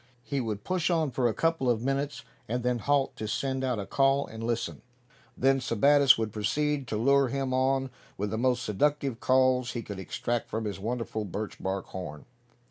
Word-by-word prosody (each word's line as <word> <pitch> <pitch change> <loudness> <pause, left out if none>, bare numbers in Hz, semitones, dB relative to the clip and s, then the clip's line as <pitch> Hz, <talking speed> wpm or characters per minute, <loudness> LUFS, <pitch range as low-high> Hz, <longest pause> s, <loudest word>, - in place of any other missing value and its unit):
He 140 +1 -2
would 105 -3 -4
push 185 -2 0
on 160 -5 +1
for 125 -1 +1
a 115 - 0
couple 165 -6 +1
of 115 -1 +1
minutes, 135 -3 -1 0.3
and 120 +1 -1
then 125 -1 +1
halt 140 +3 +1
to 110 - -4
send 130 +4 -1
out 125 -3 0
a 100 - -3
call, 135 +3 +2
and 110 0 -8
listen. 115 0 -2 0.6
Then 135 +1 +3
Sebattis 140 +3 +5
would 110 -2 -2
proceed 145 +6 0
to 110 - -2
lure 140 +4 +4
him 135 0 -2
on 130 0 +1 0.3
with 100 +1 -2
the 110 - -1
most 125 0 +1
seductive 135 +2 0
calls 130 -1 +3
he 120 - -4
could 100 -2 -7
extract 120 +5 -2
from 110 0 -3
his 100 -2 -4
wonderful 115 0 -3
birch 100 +1 -5
bark 95 0 -2
horn. 85 -5 -7
125 Hz, 195 wpm, -28 LUFS, 110-135 Hz, 0.6 s, Sebattis